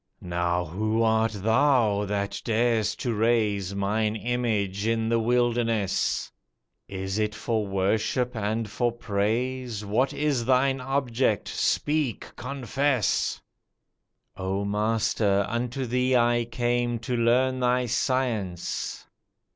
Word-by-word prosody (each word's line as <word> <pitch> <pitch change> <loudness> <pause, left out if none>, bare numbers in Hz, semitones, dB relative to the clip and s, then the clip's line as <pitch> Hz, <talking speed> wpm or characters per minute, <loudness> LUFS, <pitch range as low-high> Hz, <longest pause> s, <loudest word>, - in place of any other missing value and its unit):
"Now 85 0 -1
who 110 +7 0
art 110 0 +2
thou 110 -1 +2
that 100 0 -2
dar'st 115 -1 +1
to 120 - -1
raise 105 -4 +1
Mine 105 +2 0
image 110 -4 -1
in 115 0 +1
the 115 0 +2
wilderness? 115 -3 +1 0.6
Is 95 +1 -3
it 105 0 0
for 110 -2 -1
worship 110 +6 0
and 110 +1 -1
for 120 +3 0
praise? 115 +1 -2
What 115 +7 +1
is 145 -5 0
thine 130 +1 +2
object? 125 -4 0
speak, 150 -6 -1
confess." 135 -2 0 1.0
"Oh 95 +2 -2
Master, 105 -1 +1
unto 125 +3 -2
thee 125 +2 +1
I 120 -1 +3
came 120 0 0
To 120 +2 -3
learn 125 +2 +2
thy 125 0 +2
science. 115 -8 -2
115 Hz, 110 wpm, -26 LUFS, 105-125 Hz, 1.0 s, I